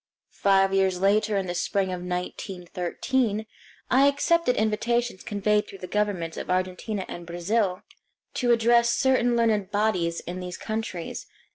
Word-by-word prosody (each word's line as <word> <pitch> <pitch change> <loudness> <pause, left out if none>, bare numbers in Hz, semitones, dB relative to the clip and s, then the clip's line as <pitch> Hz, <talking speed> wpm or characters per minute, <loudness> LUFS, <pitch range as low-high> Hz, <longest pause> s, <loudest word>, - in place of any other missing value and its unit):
Five 195 -1 +3
years 190 -2 +2
later, 210 +2 +2
in 195 - -1
the 175 - -3
spring 190 +2 0
of 180 - -5
1913, 180 +5 -2 0.5
I 270 +2 +6
accepted 285 0 +2
invitations 230 0 0
conveyed 210 0 0
through 195 - -10
the 185 - -7
governments 190 -5 -1
of - - -6
Argentina 185 +2 -2
and 175 -1 -8
Brazil 180 +2 -1 0.5
to 245 -1 +1
address 235 0 +4
certain 245 -1 +2
learned 215 -4 +2
bodies 205 -5 0
in 180 +1 -6
these 180 -1 -6
countries. 215 -6 -5
200 Hz, 140 wpm, -26 LUFS, 180-230 Hz, 0.5 s, I